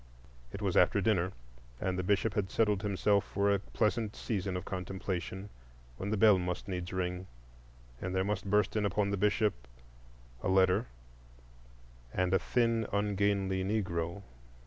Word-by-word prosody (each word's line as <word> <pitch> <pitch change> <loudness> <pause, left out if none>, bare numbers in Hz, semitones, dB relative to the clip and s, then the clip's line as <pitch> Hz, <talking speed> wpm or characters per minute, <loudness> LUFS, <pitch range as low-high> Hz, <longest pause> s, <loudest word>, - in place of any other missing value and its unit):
It 105 - -6
was 95 -3 0
after 90 +3 +5
dinner, 95 -3 +2 0.5
and 95 -1 -1
the 90 - -1
Bishop 100 +3 +1
had 100 -3 -1
settled 105 -3 +2
himself 100 0 +2
for 100 0 +1
a 100 - +1
pleasant 105 +2 -1
season 95 -4 -2
of 90 - -6
contemplation, 95 +1 -4 0.5
when 100 - -4
the 110 - 0
bell 105 -2 +6
must 90 +2 -3
needs 90 -2 -4
ring, 90 0 -2 0.7
and 95 0 -3
there 95 - +2
must 100 0 -2
burst 105 0 +2
in 105 - +1
upon 100 0 +1
the - - +1
Bishop 105 +1 +2 0.9
a - - -2
letter 95 +4 +3 1.2
and 90 +4 0
a 95 - +5
thin, 115 -2 +1
ungainly 100 -2 +1
Negro. 95 -3 -2
100 Hz, 150 wpm, -32 LUFS, 95-105 Hz, 1.2 s, bell